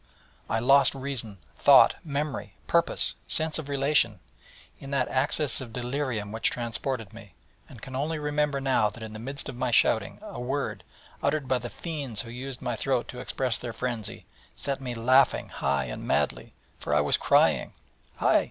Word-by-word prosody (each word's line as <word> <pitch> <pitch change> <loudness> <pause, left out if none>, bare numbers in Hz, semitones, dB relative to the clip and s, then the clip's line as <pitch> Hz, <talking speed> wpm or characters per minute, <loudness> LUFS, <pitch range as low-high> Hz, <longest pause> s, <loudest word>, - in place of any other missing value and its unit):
I - - +1
lost 135 +4 +5
reason, 130 -6 -3 0.2
thought, - - +7
memory, 150 -1 -3
purpose, 170 0 +1
sense 160 0 0
of 145 -2 -7
relation, 140 +1 +2 0.6
in 135 - -9
that 140 -2 +1
access 140 +2 +2
of 120 -3 -8
delirium 125 -4 -2
which 110 +2 +2
transported 120 -2 -3
me, 105 -5 -13 0.3
and 115 -5 -13
can 130 - -7
only 155 +4 -1
remember 150 -1 0
now 130 -6 +2
that 115 +1 -11
in 110 -1 -7
the 110 - -7
midst 135 +4 -4
of 135 - -6
my 125 0 -1
shouting, 110 -2 +2
a 210 -11 -7
word, 135 +3 -2 0.4
uttered 140 -1 0
by 130 -1 +2
the 120 0 -6
fiends 140 -10 -3
who 115 - -9
used 130 +1 -7
my 120 - -1
throat 130 +1 0
to 125 - -7
express 130 -1 -1
their 120 -2 -5
frenzy, 120 -4 -4 0.3
set 140 -1 -3
me 125 -2 -4
laughing 130 +4 +3
high 70 -1 0
and - - -6
madly: - - 0 0.2
for - - -1
I - - +5
was - - +3
crying: - - +3 0.4
'Hi! - - +4
130 Hz, 175 wpm, -27 LUFS, 115-140 Hz, 0.6 s, thought